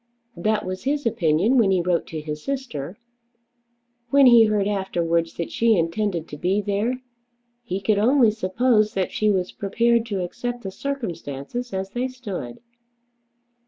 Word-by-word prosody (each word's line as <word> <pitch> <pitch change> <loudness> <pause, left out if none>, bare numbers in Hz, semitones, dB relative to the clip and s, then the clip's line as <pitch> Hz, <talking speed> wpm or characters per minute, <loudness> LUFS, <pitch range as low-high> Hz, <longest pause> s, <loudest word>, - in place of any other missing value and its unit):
That 215 +4 0
was 185 +3 -5
his 290 0 0
opinion 200 +4 +2
when 210 -4 +4
he 190 -1 +3
wrote 175 -1 0
to 160 -1 -5
his 150 0 -6
sister. 210 - -4 1.1
When 280 +2 +6
he 235 -2 +8
heard 210 -2 +1
afterwards 170 -4 -1
that 170 - -4
she 230 -2 +3
intended 170 0 -1
to 150 - -7
be 185 +6 +1
there, 210 +5 -1 0.6
he 210 -6 -4
could 200 +1 +1
only 240 +1 +4
suppose 215 +2 +1
that 190 -2 -1
she 215 - +1
was 185 -3 0
prepared 230 +3 +1
to 195 -4 -2
accept 245 +7 -5
the 195 - -5
circumstances 225 - -5
as 190 0 -4
they 245 +3 -1
stood. 205 - -7
205 Hz, 155 wpm, -23 LUFS, 175-235 Hz, 1.1 s, he